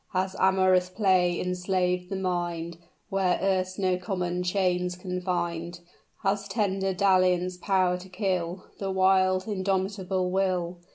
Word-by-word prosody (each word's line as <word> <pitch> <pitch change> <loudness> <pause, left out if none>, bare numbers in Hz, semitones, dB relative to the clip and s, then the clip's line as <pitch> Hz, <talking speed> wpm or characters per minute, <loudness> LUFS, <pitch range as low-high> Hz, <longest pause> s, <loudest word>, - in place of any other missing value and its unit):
Has 185 +1 -1
amorous 185 -1 +3
play 185 -3 +2
enslaved 180 0 -1
the 195 - -3
mind 175 -3 -2 0.3
Where 190 -2 +1
erst 185 -1 0
no 185 -2 +1
common 180 -1 -2
chains 180 -1 0
confined? 175 -2 -3 0.4
Has 200 0 0
tender 195 -2 0
dalliance 185 -1 +2
power 185 -1 +1
to 185 +1 -12
kill 185 -2 -2
The 195 - -2
wild, 185 0 +3
indomitable 190 -2 -1
will? 180 -2 0
185 Hz, 120 wpm, -27 LUFS, 180-190 Hz, 0.4 s, amorous